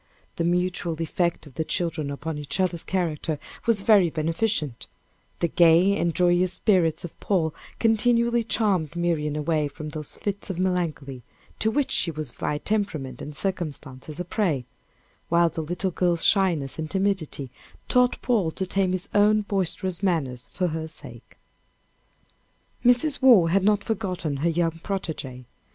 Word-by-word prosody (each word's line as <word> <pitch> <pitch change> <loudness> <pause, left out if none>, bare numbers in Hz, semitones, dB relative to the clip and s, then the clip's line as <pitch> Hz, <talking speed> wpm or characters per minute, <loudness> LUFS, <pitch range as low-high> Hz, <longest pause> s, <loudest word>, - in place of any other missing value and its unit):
The 170 - 0
mutual 175 -1 0
effect 170 0 -1
of 145 - -14
the 160 - -2
children 160 -3 -2
upon 150 +2 -4
each 145 +5 -4
other's 180 -3 0
characters 165 -4 -2 0.3
was 225 -4 +4
very 200 -4 +5
beneficent; 160 - -1 0.5
the 170 - +3
gay 170 +4 +5
and 170 -5 0
joyous 180 0 +3
spirits 175 -6 +2
of 170 - -11
Paul 165 -6 0 0.2
continually 235 +1 +2
charmed 195 -9 +1
Miriam 165 -4 0
away 150 0 0
from 155 +1 -8
those 150 -1 -5
fits 200 0 -4
of 190 - -3
melancholy, 170 -8 -2 0.4
to 220 - +2
which 280 +4 0
she - - +2
was 155 -5 -4
by 150 - -2
temperament 160 - -2
and 150 - -7
circumstances 155 -4 -4
a 180 - -3
prey, 170 - 0 0.6
while 170 0 +4
the 160 - -4
little 175 +4 -2
girl's 175 -1 +1
shyness 170 -9 +2
and 155 -1 -3
timidity 190 -9 -1 0.4
taught 250 -1 +3
Paul 215 -9 +2
to 190 - -2
tame 185 0 +1
his 185 +1 -3
own 210 +1 +4
boisterous 190 -2 -1
manners 140 -10 -1
for 180 -1 -1
her 160 0 -4
sake. 160 - -10 1.5
Mrs. 250 +4 +3
Waugh 225 -11 +7
had 190 +3 +2
not 205 0 +3
forgotten 185 -10 -2
her 160 +5 +1
young 165 0 0
protége. 155 -11 -5
175 Hz, 150 wpm, -25 LUFS, 155-195 Hz, 1.5 s, Waugh